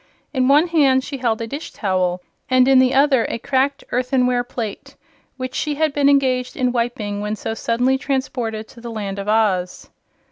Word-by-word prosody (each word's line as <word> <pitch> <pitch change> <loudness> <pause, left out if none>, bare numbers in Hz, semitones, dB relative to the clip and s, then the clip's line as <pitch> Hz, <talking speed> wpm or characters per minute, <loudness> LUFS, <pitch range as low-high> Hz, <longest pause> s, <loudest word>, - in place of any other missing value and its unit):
In 255 -2 +1
one 290 +4 +5
hand 275 -5 +3
she 275 - -6
held 230 -3 0
a - - -2
dish 285 +7 -6
towel 185 -3 -1 0.3
and 255 0 +4
in 270 -1 +6
the 255 -1 +4
other 270 -3 +3
a - - -3
cracked 275 +3 0
earthenware 250 -1 +1
plate, 225 -4 -6 0.4
which 255 -1 -5
she 295 +2 -2
had 310 -1 0
been 285 -1 +3
engaged 260 -3 +1
in 250 -2 +1
wiping 230 -4 -2
when 210 +1 -2
so 220 - -4
suddenly 245 +4 0
transported 245 -5 -3
to 235 - -14
the 235 - -7
Land 200 -3 -5
of 200 - -5
Oz. 205 -5 0
250 Hz, 185 wpm, -20 LUFS, 220-270 Hz, 0.4 s, in